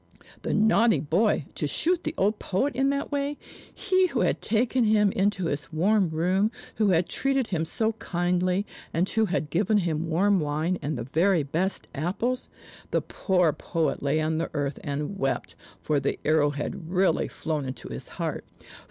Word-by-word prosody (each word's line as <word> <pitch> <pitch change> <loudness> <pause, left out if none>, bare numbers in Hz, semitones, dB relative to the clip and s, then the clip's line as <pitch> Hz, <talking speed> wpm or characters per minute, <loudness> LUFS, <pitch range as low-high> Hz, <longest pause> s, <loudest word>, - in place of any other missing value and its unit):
The - - -2
naughty 220 +1 +4
boy, 170 +1 +1
to 150 - -2
shoot 345 - +1
the 315 - -2
old 210 +2 +1
poet 265 +10 0
in 270 +1 +2
that 280 +1 -2
way; 285 0 -1 0.3
he 370 0 +2
who - - -1
had - - +1
taken 235 +3 +1
him 210 -2 +4
into 195 -1 0
his 145 -1 -3
warm 190 +3 +2
room, 180 +6 +1 0.3
who 215 - +3
had 175 -2 +3
treated 270 -3 0
him 165 -3 0
so 220 +6 0
kindly, 180 0 0 0.3
and 175 +3 +2
who 220 +1 +1
had 160 -6 -2
given 205 +5 +2
him 165 -3 -1
warm 195 +4 +3
wine 155 +4 -1
and 145 -1 -2
the 120 - -3
very 165 +6 +2
best 170 +7 -2
apples! 200 - -2 0.4
The - - +1
poor 180 -5 +1
poet 160 +2 -1
lay 145 +2 +1
on 155 +1 0
the 165 - -2
earth 145 -1 -2
and 150 +7 -3
wept, 135 0 -1 0.3
for 150 -2 0
the 140 - -1
arrow 155 -1 +4
had 150 +3 -5
really 185 +1 +2
flown 155 -2 -3
into 130 0 -6
his - - -7
heart. - - -3
180 Hz, 180 wpm, -26 LUFS, 155-215 Hz, 0.4 s, naughty